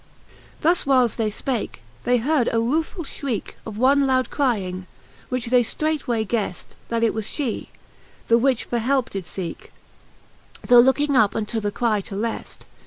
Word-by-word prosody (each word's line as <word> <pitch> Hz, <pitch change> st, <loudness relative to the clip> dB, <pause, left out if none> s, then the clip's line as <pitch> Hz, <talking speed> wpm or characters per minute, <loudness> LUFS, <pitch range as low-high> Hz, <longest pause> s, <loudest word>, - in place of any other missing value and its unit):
XVIL -, -, -27 dB
Thus 340 Hz, +3 st, +2 dB
whiles 255 Hz, -5 st, +3 dB
they 220 Hz, -2 st, +1 dB
fpake, 235 Hz, +2 st, -3 dB, 0.3 s
they 245 Hz, 0 st, +4 dB
heard 255 Hz, +1 st, +1 dB
a 230 Hz, -, +1 dB
ruefull 315 Hz, -, -1 dB
fhrieke 270 Hz, -6 st, -4 dB
Of 215 Hz, -2 st, -7 dB
one 275 Hz, +3 st, +4 dB
loud 255 Hz, -2 st, +1 dB
crying, 190 Hz, -9 st, -1 dB, 0.4 s
which 250 Hz, -2 st, -3 dB
they 250 Hz, -1 st, +6 dB
ftreight 310 Hz, +5 st, -1 dB
way 230 Hz, -3 st, 0 dB
gheft,. 210 Hz, -4 st, -3 dB, 0.2 s
That 230 Hz, 0 st, 0 dB
it 230 Hz, -, +3 dB
was 220 Hz, -1 st, -3 dB
fhe, 270 Hz, -7 st, -2 dB, 0.6 s
the 230 Hz, 0 st, +5 dB
which 260 Hz, -1 st, +2 dB
for 240 Hz, -, -2 dB
helpe 260 Hz, +2 st, 0 dB
did 195 Hz, -3 st, -5 dB
feeke. 175 Hz, -1 st, -6 dB, 1.0 s
Tho 245 Hz, -1 st, +7 dB
looking 275 Hz, +3 st, +4 dB
up 215 Hz, -5 st, +4 dB
unto 225 Hz, +1 st, -2 dB
the 205 Hz, -1 st, -2 dB
cry 215 Hz, -1 st, 0 dB
to 195 Hz, -, -8 dB
left. 225 Hz, +3 st, -4 dB
235 Hz, 175 wpm, -23 LUFS, 220-265 Hz, 1.0 s, Tho